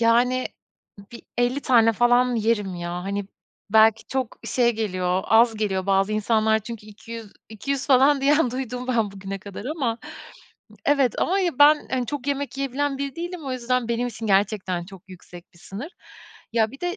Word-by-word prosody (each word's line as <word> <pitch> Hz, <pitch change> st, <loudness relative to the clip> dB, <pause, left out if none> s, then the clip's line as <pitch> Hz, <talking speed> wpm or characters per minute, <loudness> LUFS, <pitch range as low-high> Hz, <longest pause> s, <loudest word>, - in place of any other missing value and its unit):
Yani, 245 Hz, +2 st, +3 dB, 0.7 s
bir 235 Hz, -, -10 dB, 0.2 s
50 245 Hz, +3 st, +1 dB
tane 230 Hz, -4 st, +4 dB
falan 245 Hz, +2 st, +3 dB
yerim, 210 Hz, -4 st, 0 dB
ya. 175 Hz, 0 st, -5 dB
Hani, 200 Hz, 0 st, -3 dB, 0.4 s
belki 220 Hz, +1 st, +5 dB
çok 260 Hz, -3 st, -3 dB
şey 240 Hz, -2 st, +2 dB
geliyor, 185 Hz, -4 st, -1 dB
az 225 Hz, +1 st, +5 dB
geliyor 195 Hz, -3 st, -1 dB
bazı 195 Hz, +1 st, +2 dB
insanlar 220 Hz, 0 st, +2 dB
çünkü 215 Hz, 0 st, -9 dB
iki 215 Hz, +2 st, -12 dB
yüz 225 Hz, -3 st, -8 dB, 0.2 s
iki 220 Hz, +5 st, -7 dB
yüz 275 Hz, -1 st, -1 dB
falan 275 Hz, +1 st, +5 dB
diyen 285 Hz, -1 st, +3 dB
duydum 250 Hz, 0 st, -5 dB
ben 225 Hz, -5 st, +1 dB
bugüne 195 Hz, 0 st, -6 dB
kadar 200 Hz, +2 st, -9 dB
ama 260 Hz, -6 st, -2 dB, 0.9 s
Evet, 280 Hz, -4 st, +2 dB
ama 375 Hz, -, +1 dB, 0.2 s
ben, 300 Hz, +1 st, +6 dB
hani, 250 Hz, -2 st, -1 dB
çok 285 Hz, -1 st, -5 dB
yemek 280 Hz, -2 st, -2 dB
yiyebilen 275 Hz, +1 st, -1 dB
biri 280 Hz, -1 st, -4 dB
değilim. 345 Hz, -1 st, -5 dB
O 260 Hz, -, -2 dB
yüzden 250 Hz, -1 st, -1 dB
benim 235 Hz, +1 st, 0 dB
için 225 Hz, -1 st, -7 dB
gerçekten 195 Hz, -3 st, +1 dB
çok 190 Hz, -1 st, -13 dB
yüksek 180 Hz, -1 st, -13 dB
bir 170 Hz, -, -19 dB
sınır. 230 Hz, -, -8 dB, 0.6 s
Ya, 225 Hz, -2 st, +2 dB
bir 275 Hz, -, -12 dB
de 355 Hz, +3 st, -2 dB
230 Hz, 175 wpm, -24 LUFS, 210-265 Hz, 0.9 s, ben